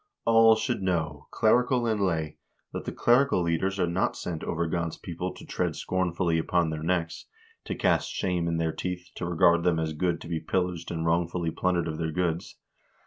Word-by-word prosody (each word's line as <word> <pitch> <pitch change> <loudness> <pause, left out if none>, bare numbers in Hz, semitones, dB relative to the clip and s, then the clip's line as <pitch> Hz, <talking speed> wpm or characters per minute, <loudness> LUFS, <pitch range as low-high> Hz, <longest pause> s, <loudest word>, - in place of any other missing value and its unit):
"All 115 0 +6
should 110 - -2
know, 80 -6 -2
clerical 125 +2 +3
and 110 -3 0
lay, 80 -5 -1 0.3
that - - -5
the - - -3
clerical 120 -5 +3
leaders 95 +4 0
are 90 - +3
not 85 +2 0
set 85 -3 -5
over 85 0 -1
God's 85 0 -2
people 90 +1 -5
to - - -11
tread - - -2
scornfully 90 -2 0
upon 85 0 +1
their 80 -1 -4
necks, 85 0 -2 0.4
to - - -3
cast - - +1
shame 90 -2 -1
in 85 0 0
their 80 -1 0
teeth, 90 +1 -5
to 85 - -3
regard 85 0 +4
them 85 -1 +2
as 80 -1 -2
good 85 +2 0
to - - -8
be 85 -1 -2
pillaged 90 +1 -2
and 80 -1 -3
wrongfully 85 0 0
plundered 90 -1 0
of 80 0 -4
their 80 -1 -1
goods. 85 0 -2
85 Hz, 195 wpm, -27 LUFS, 80-90 Hz, 0.4 s, All